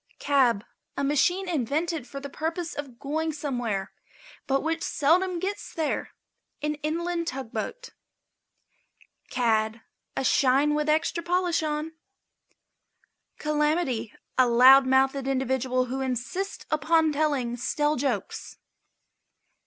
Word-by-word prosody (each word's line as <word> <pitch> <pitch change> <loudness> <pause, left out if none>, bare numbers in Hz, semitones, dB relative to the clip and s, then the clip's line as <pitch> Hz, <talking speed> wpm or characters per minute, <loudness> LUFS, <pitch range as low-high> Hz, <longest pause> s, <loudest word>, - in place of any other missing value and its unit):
### - - -51
CAB. 250 -7 +2 0.3
A 280 - -1
machine 350 +7 +2
invented 310 -1 -1
for 275 - -7
the 280 - -6
purpose 325 +4 -3
of 275 -5 -7
going 315 +5 -2
somewhere, 245 -10 -3 0.6
but 270 0 +1
which 325 +1 -1
seldom 350 +6 +2
gets 385 +4 -4
there. 320 -3 -1 0.5
An 300 0 0
inland 335 +2 -2
tugboat. 260 - -5 1.4
CAD. 225 -2 +1 0.4
A - - 0
shine 275 +3 +3
with 300 0 0
an 305 - +6
extra 340 +2 -2
polish 350 0 +1
on. 305 +1 -2 1.4
CALAMITY. 300 -6 0 0.3
A 255 - +6
loud 260 +3 +7
mouthed 265 +1 +2
individual 260 -1 0
who 260 +2 -4
insists 265 - -3
upon 315 +1 +3
telling 285 -5 0
stale 295 +5 0
jokes. 245 -8 -3
290 Hz, 115 wpm, -26 LUFS, 255-320 Hz, 1.4 s, loud